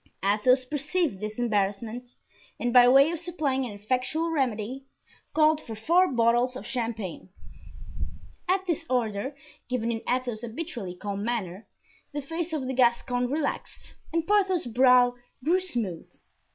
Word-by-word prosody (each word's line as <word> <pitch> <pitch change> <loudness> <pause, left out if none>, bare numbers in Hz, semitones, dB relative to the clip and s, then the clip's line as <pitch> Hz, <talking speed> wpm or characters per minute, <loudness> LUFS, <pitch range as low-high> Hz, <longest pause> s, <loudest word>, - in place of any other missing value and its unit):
Athos 235 +6 +3
perceived 295 - -1
this 215 +1 -5
embarrassment, 225 +2 -1 0.4
and 240 0 -1
by 245 -1 +8
way 275 +5 +6
of 340 - -3
supplying 295 -7 -1
an - - -7
effectual 255 +10 -1
remedy, 260 -2 -2 0.5
called 310 0 +4
for 225 - -7
four 340 - +3
bottles 240 +1 +2
of 260 - -7
champagne. 225 -8 -4 1.2
At 380 +1 +2
this 335 -3 -1
order, 240 +1 -1 0.3
given 235 -2 0
in 225 -1 -3
Athos's 245 -3 -1
habitually 235 - -5
calm 200 +1 -4
manner, 215 -4 -3 0.5
the 290 - -2
face 330 +4 -4
of 300 -5 -2
the 260 - -2
Gascon 245 0 +2
relaxed 290 +1 -4 0.2
and 330 0 0
Porthos's 380 - +2
brow 250 0 +6 0.3
grew 345 +6 +3
smooth. 235 - -3
250 Hz, 140 wpm, -27 LUFS, 225-305 Hz, 1.2 s, by